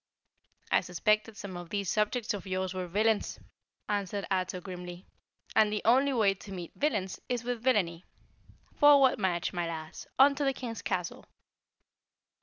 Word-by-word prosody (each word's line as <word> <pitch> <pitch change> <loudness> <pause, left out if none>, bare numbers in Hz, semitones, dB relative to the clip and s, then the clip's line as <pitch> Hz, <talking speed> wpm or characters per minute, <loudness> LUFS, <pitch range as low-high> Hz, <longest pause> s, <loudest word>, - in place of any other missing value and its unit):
"I - - +4
suspected 215 +4 0
some 195 -2 -7
of 175 -1 -8
these 200 0 -2
subjects 215 +4 0
of 200 -1 -6
yours 185 0 -2
were 185 -1 -4
villains," 210 +4 +1 0.5
answered 200 -1 -2
Ato 185 -1 0
grimly, 180 -1 -8 0.5
"and 215 -1 +5
the 210 - -2
only 265 +5 +4
way 215 -6 +3
to 195 +1 -12
meet 175 -3 -7
villains 210 -11 -1
is 245 -1 -1
with 245 -1 -3
villainy. 190 -9 +1 0.7
Forward 285 -4 +6
march, 180 -3 0
my 175 -1 -1
Lass! 160 -1 -7
On 280 +2 +7
to 285 +1 -2
the 270 -1 +2
King's 235 -4 -6
castle!" 180 -2 -3
205 Hz, 155 wpm, -30 LUFS, 180-235 Hz, 0.7 s, On